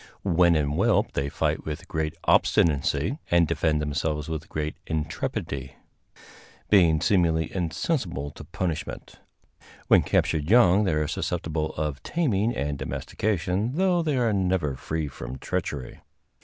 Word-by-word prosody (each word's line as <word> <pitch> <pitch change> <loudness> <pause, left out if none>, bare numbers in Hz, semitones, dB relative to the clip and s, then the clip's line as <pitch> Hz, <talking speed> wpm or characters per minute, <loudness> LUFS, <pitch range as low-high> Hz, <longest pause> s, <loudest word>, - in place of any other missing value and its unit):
When 85 -2 +4
in 75 -2 +1
whelp 75 - +2
they 70 +1 -2
fight - - -1
with 75 -1 -6
great 80 0 -2
obstinacy, 80 - +2
and 85 -1 +4
defend 80 -1 +1
themselves 75 +1 -2
with 80 -1 -4 0.4
intrepidity, 70 -3 -3 1.0
being 85 -6 +5
seemingly 85 -5 +2
insensible 85 - -2
to 75 - -11
punishment. 85 +1 -5 0.7
When - - +7
captured 75 0 0
young 105 -3 +5
they 95 - +1
are 75 0 0
susceptible 80 -1 -2
of 75 -2 -3
taming 120 - 0
and 70 0 -2
domestication, 95 - -2
though 180 0 +2
they 150 -4 0
are 115 -3 +2
never 90 -7 0
free 80 +3 -3
from 65 -1 -7
treachery. 65 -1 -4
80 Hz, 130 wpm, -26 LUFS, 75-95 Hz, 1.0 s, When